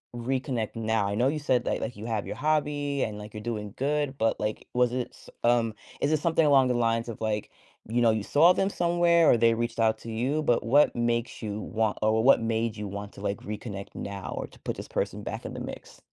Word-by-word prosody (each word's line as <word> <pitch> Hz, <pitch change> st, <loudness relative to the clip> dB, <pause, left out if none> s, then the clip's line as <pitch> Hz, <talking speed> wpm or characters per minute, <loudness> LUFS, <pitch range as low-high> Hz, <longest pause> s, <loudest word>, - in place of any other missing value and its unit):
reconnect 125 Hz, -2 st, -2 dB
now? 110 Hz, -2 st, +1 dB
I 100 Hz, -, -2 dB
know 120 Hz, +5 st, +3 dB
you 150 Hz, +2 st, 0 dB
said 130 Hz, -4 st, +1 dB
that, -, -, 0 dB
like -, -, -2 dB
like, 125 Hz, -, -4 dB
you 105 Hz, -, -7 dB
have 110 Hz, -3 st, -2 dB
your -, -, -5 dB
hobby, 145 Hz, -2 st, 0 dB
and, 105 Hz, -1 st, -3 dB
like, 105 Hz, 0 st, -9 dB
you're 105 Hz, -, -7 dB
doing 105 Hz, -3 st, -4 dB
good, 145 Hz, 0 st, -1 dB
but, 115 Hz, -2 st, +1 dB
like, 105 Hz, 0 st, -3 dB
was 125 Hz, -1 st, +2 dB
it 125 Hz, -1 st, -2 dB
s -, -, -16 dB
um, 120 Hz, -2 st, +3 dB, 0.3 s
is 140 Hz, -, +1 dB
it 155 Hz, -, +2 dB
something 165 Hz, -1 st, +3 dB
along 135 Hz, -3 st, +5 dB
the -, -, +2 dB
lines 115 Hz, -1 st, +1 dB
of, 115 Hz, -, -7 dB
like, 110 Hz, -2 st, -2 dB, 0.4 s
you 120 Hz, +2 st, +1 dB
know, 115 Hz, -, +5 dB
you 110 Hz, -1 st, 0 dB
saw 165 Hz, -, +5 dB
them 195 Hz, +2 st, +1 dB
somewhere, 170 Hz, -2 st, +3 dB
or -, -, +5 dB
they 115 Hz, 0 st, +4 dB
reached 115 Hz, 0 st, -3 dB
out 110 Hz, -1 st, +3 dB
to 115 Hz, -, -8 dB
you, 130 Hz, +7 st, 0 dB
but 120 Hz, -5 st, +2 dB
what 145 Hz, +6 st, +4 dB
makes 120 Hz, 0 st, -1 dB
you 105 Hz, -2 st, -4 dB
want 110 Hz, 0 st, -1 dB
or 110 Hz, +1 st, +3 dB
what 135 Hz, -, +6 dB
made 115 Hz, 0 st, -1 dB
you 105 Hz, 0 st, -4 dB
want 100 Hz, +1 st, -6 dB
to, -, -, -11 dB
like, 100 Hz, -1 st, -1 dB
reconnect 105 Hz, -1 st, -7 dB
now, 100 Hz, -1 st, -5 dB
or -, -, -3 dB
to -, -, -19 dB
put -, -, -4 dB
this -, -, -7 dB
person -, -, -3 dB
back -, -, -5 dB
in -, -, -5 dB
the -, -, -5 dB
mix? -, -, -8 dB
115 Hz, 250 wpm, -27 LUFS, 110-135 Hz, 0.4 s, what